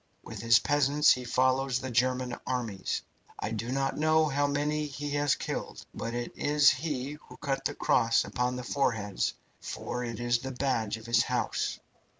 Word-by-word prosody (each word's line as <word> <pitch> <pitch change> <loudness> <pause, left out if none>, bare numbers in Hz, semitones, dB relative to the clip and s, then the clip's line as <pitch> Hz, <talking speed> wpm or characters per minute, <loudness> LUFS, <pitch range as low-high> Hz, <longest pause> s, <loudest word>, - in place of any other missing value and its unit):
With 110 -3 -8
his 115 0 +6
peasants 145 +2 +4
he 125 - +2
follows 130 +1 +2
the 130 0 -5
German 125 +1 +1
armies. 115 -7 -2 0.3
I - - -3
do 115 +2 -3
not 135 +1 -1
know 155 0 +4
how 145 -1 +1
many 150 +1 0
he 145 +1 -5
has 145 -1 +2
killed, - - -5
but 115 +1 -4
it 120 0 -4
is 145 -1 +5
he 145 -1 -3
who - - -12
cut 140 -2 -2
the - - -1
cross 115 0 +3
upon 125 0 -1
the 125 - -5
foreheads, 115 -7 0 0.2
for 125 - -4
it 115 -1 -5
is 120 -1 +1
the 135 +2 -5
badge 120 -5 -1
of 110 - -13
his 115 0 +4
house." - - -1
130 Hz, 175 wpm, -29 LUFS, 120-145 Hz, 0.3 s, his